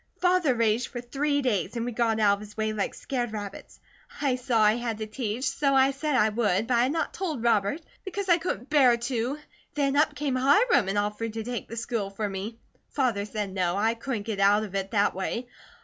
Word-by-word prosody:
Father 360 -7 +3
raged 230 +1 +1
for 245 - -6
three 285 +4 -1
days 205 -5 0
and 235 0 -2
we 245 - -2
got 225 -1 +1
out 205 -2 +5
of 200 - -3
his 210 0 -12
way 220 0 0
like 210 -2 -2
scared 245 -4 -3
rabbits. 205 -2 -7 0.4
I 275 -3 +1
saw 250 -2 0
I 210 0 +5
had 235 -2 -3
to 215 - -4
teach, 225 +3 -3
so 275 0 +1
I 265 +1 +5
said 285 +1 -2
I 220 -4 +4
would, 210 -2 +1
but 245 +1 +1
I - - +4
had 255 +3 +2
not 325 +1 -2
told 315 -11 -3
Robert, 230 +5 +2 0.2
because 395 0 -4
I 345 -1 +5
couldn't 280 - -4
bear 260 -5 +5
to. 240 +3 -2 0.4
Then 280 -2 +1
up 300 0 +3
came 290 -3 -1
Hiram 285 - +4
and 200 - -1
offered 210 +2 -2
to 225 0 -4
take 245 +1 -4
the 230 - -8
school 230 -4 -2
for 205 +2 -3
me. 200 +3 -5 0.3
Father 240 -8 0
said 210 -2 -4
no, 180 -2 0
I 220 +3 +2
couldn't 235 -2 -4
get 210 -2 -4
out 205 +2 +4
of 205 -3 -7
it 195 -1 -2
that 205 -2 +2
way. 230 +6 -3
235 Hz, 225 wpm, -27 LUFS, 210-270 Hz, 0.4 s, out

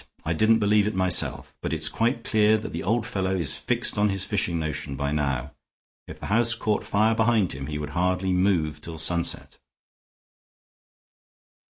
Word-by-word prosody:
I 80 - 0
didn't 110 +7 +4
believe 105 -1 +2
it 105 - -3
myself, 95 -2 +1
but - - -3
it's 80 -1 +1
quite 115 - -1
clear 110 0 +3
that 110 - -7
the 85 - -3
old 110 +5 0
fellow 95 -3 -2
is 85 -7 -2
fixed - - 0
on 105 - +4
this 95 -1 -1
fishing 90 -5 -1
notion 75 -3 -4
by 70 +1 -2
now. 70 -2 -2 0.6
If - - -10
the - - -7
house 115 +3 +2
caught 110 -2 -1
fire 110 +2 +2
behind 110 -4 +2
him 70 0 -6
he 75 -1 -4
would 75 -1 -5
hardly 90 +3 0
move 90 -5 +1
till 80 -1 -7
sunset." 85 +2 0
95 Hz, 175 wpm, -25 LUFS, 80-105 Hz, 0.6 s, didn't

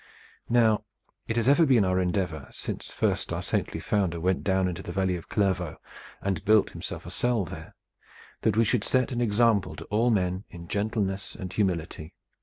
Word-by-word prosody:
Now 115 -3 +4 0.4
it 110 - -1
has 115 0 +1
ever 145 +5 +6
been 125 -9 +4
our 95 0 +2
endeavor, 90 -5 -1
since - - -6
first - - 0
our - - -2
saintly - - -1
founder 95 -5 0
went 90 +2 0
down 95 -1 +2
into 90 0 -4
the - - -6
valley 95 -2 0
of 85 - -8
Clairvaux 95 -5 0 0.5
and 95 -3 -1
built 105 0 +4
himself - - -6
a - - -7
cell 120 -5 +1
there, - - -9 0.7
that 110 -1 +1
we 115 - +5
should 115 -1 +1
set 130 +1 +1
an 120 -1 -1
example 110 -2 +2
to - - -8
all 115 +4 +3
men 95 -3 +1
in 85 -1 -10
gentleness 100 -1 -2
and 95 -4 -6
humility. 85 -5 -2
100 Hz, 185 wpm, -27 LUFS, 90-110 Hz, 0.7 s, ever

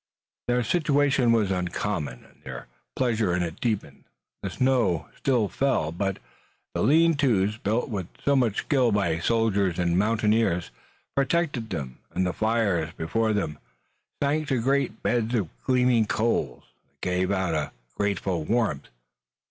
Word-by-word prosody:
Their 125 0 +2
situation 140 -4 +2
was 110 -4 +2
uncommon, 90 -6 -2
and - - -24
their 65 -2 -7 0.3
pleasure 110 -8 +1
in 90 - 0
it 85 +1 -6
deepened. 110 -4 -2 0.4
The - - -3
snow 125 - +1
still 125 -6 +1
fell, 130 - 0
but 95 +3 -2 0.6
the - - -1
lean 165 +3 +5
tos, 110 -8 +1
built 110 +2 0
with 95 -7 -4 0.2
so 140 - +4
much 120 -6 +2
skill 130 -5 +2
by 95 -6 +1
soldiers 100 -3 +1
and 85 -1 +1
mountaineers, 105 -4 +1 0.4
protected 140 -5 0
them, 70 -8 -5 0.2
and 95 - +1
the 90 - -1
fires 105 -8 +1
before 110 +8 0
them 75 -8 -2 0.6
sank 150 +2 +1
to 130 -3 +1
great 135 -1 0
beds 120 0 +1
of 100 -8 0 0.2
gleaming 125 -4 +3
coals 90 - 0 0.2
that - - -43
gave 90 0 0
out 95 -4 0
a 75 -2 -1 0.2
grateful 95 -4 -1
warmth. 110 - 0
110 Hz, 145 wpm, -26 LUFS, 90-125 Hz, 0.6 s, lean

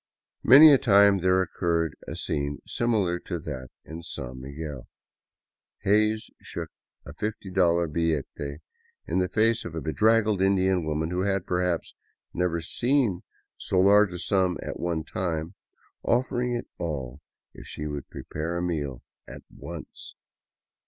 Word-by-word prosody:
Many 145 +5 +9
a 135 - +5
time 100 -2 +5
there 95 +1 +3
occurred 85 -2 -1
a - - -5
scene 70 -1 -2
similar 105 -7 0
to 85 - -5
that 70 -5 -6 0.2
at 80 +1 -8
San 65 -4 -7
Miguel. 70 0 -7 1.0
Hays 110 +2 +2
shook - - -6 0.3
a 70 - -9
$50 105 +7 -2 0.2
billete 85 -4 0 0.4
in 85 +3 0
the 90 -1 0
face 115 +1 +2
of 80 - -7
a - - -2
bedraggled 105 +6 +2
Indian 95 -2 +2
woman 80 +2 -1
who 90 +1 -1
had, 95 -1 0
perhaps, 90 -2 -1 0.4
never 90 -1 0
before - - -4
seen 120 - +1 0.4
so 95 - 0
large 100 +1 +5
a 90 - -5
sum 90 -1 +1
at - - -6
one 85 -2 -1
time, 80 -1 -3 0.5
offering 125 0 0
it 120 - -4
all 70 -5 -4 0.3
if - - -12
she 75 - -6
would 75 -2 -5
prepare 80 +3 -4
a 85 - -2
meal 75 -8 -3 0.2
at - - -10
once. - - -9
90 Hz, 145 wpm, -26 LUFS, 80-100 Hz, 1.0 s, Many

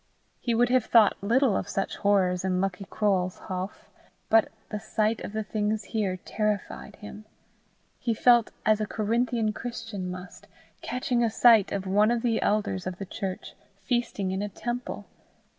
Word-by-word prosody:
He 235 -2 -1
would 240 +1 +3
have 255 -2 +3
thought 220 -3 +4
little 235 +2 +3
of - - -2
such 195 - -2
horrors 185 -3 +2
in 185 -1 0
Lucky 195 +1 -2
Croale's 190 -3 0
houff, 185 +2 -5 0.5
but 225 0 +5 0.2
the 210 - -3
sight 220 +1 0
of - - -5
the 220 +1 -2
things 210 0 -1
here 200 -3 -2
terrified 210 +2 -3
him. 210 0 -10 0.7
He 230 -2 -1
felt 240 0 +5 0.2
as 215 0 +3
a 215 - -1
Corinthian 225 +1 0
Christian 225 -6 -5
must, 180 +1 -9 0.3
catching 250 -1 -1
a 230 - +3
sight 225 -2 +5
of 195 -1 -2
one 205 +3 +3
of 240 0 0
the 230 -2 +1
elders 200 -3 0
of 180 -1 -4
the 195 - -5
church 190 0 -5 0.3
feasting 235 -5 -1
in 190 +1 -2
a 205 - -2
temple. 240 +5 -5
215 Hz, 165 wpm, -27 LUFS, 195-230 Hz, 0.7 s, but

